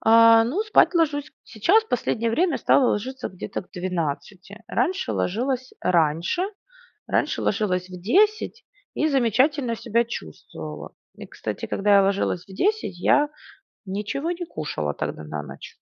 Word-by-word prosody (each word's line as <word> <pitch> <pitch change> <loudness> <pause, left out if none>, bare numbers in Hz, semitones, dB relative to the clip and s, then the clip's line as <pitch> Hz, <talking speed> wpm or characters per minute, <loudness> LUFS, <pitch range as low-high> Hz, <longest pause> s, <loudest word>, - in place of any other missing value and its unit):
А, 230 0 +7
ну 315 - -1
спать 425 -3 +4
ложусь 300 -3 0
сейчас, 355 - +3
последнее 230 - -1
время 335 +5 +1
стала 260 - +4
ложиться 255 +5 -3
где-то 190 +2 -6
к - - -27
12:00. 180 +4 -4
Раньше 375 +2 0
ложилась 250 +6 -1
раньше, 170 - +1 0.7
раньше - - 0
ложилась 185 -3 0
в 180 -1 -9
10:00 425 - +2 0.3
и 310 - +1
замечательно 260 0 +2
себя 235 +1 +1
чувствовала. 80 - -8 0.2
И, - - -9
кстати, - - -5
когда 200 0 +3
я 195 - +5
ложилась 195 -2 0
в 190 - -12
10:00, 385 - 0
я 290 +11 +3 0.6
ничего 210 - -3
не 350 0 -4
кушала 80 - -4
тогда 80 - -5
на 75 -1 -5
ночь. 70 -1 -11
225 Hz, 140 wpm, -24 LUFS, 180-290 Hz, 0.7 s, А